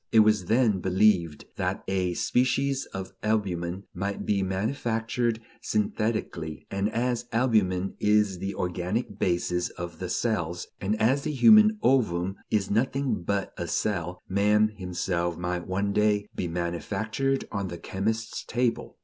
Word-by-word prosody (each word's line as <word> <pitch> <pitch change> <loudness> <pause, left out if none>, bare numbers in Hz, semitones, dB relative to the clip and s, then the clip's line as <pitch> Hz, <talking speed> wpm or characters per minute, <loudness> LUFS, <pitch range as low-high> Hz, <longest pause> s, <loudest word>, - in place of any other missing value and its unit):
It 110 - +7
was 105 -3 +3
then 110 -1 +3
believed 90 -4 +2
that - - -2
a 95 -2 0
species 135 +4 +1
of 95 0 -7
albumen 95 -4 -1
might 100 +3 -3
be 100 -2 +1
manufactured 115 +3 -1 0.2
synthetically, 105 -7 -2
and 100 +2 0
as 120 +1 -1
albumen 105 -6 +2
is 105 -3 +2
the 95 +2 -3
organic 90 +5 -2
basis 90 0 0
of 85 -2 -7
the 90 - -4
cells, 90 -8 -1
and 105 +3 -1
as 130 +6 +3
the 150 - -2
human 215 - +7
ovum 95 -8 +2
is 100 -3 0
nothing 130 +1 0
but 100 +2 -2
a 85 - -2
cell, 90 0 -1
man 105 +2 +3
himself 90 -3 -2
might 90 0 -3
one 100 +2 -1
day 105 0 +2
be 90 - -3
manufactured 95 - -2
on 100 -2 -2
the 85 -1 -6
chemist's 110 +6 -3
table. 120 0 -1
100 Hz, 140 wpm, -27 LUFS, 90-110 Hz, 0.2 s, It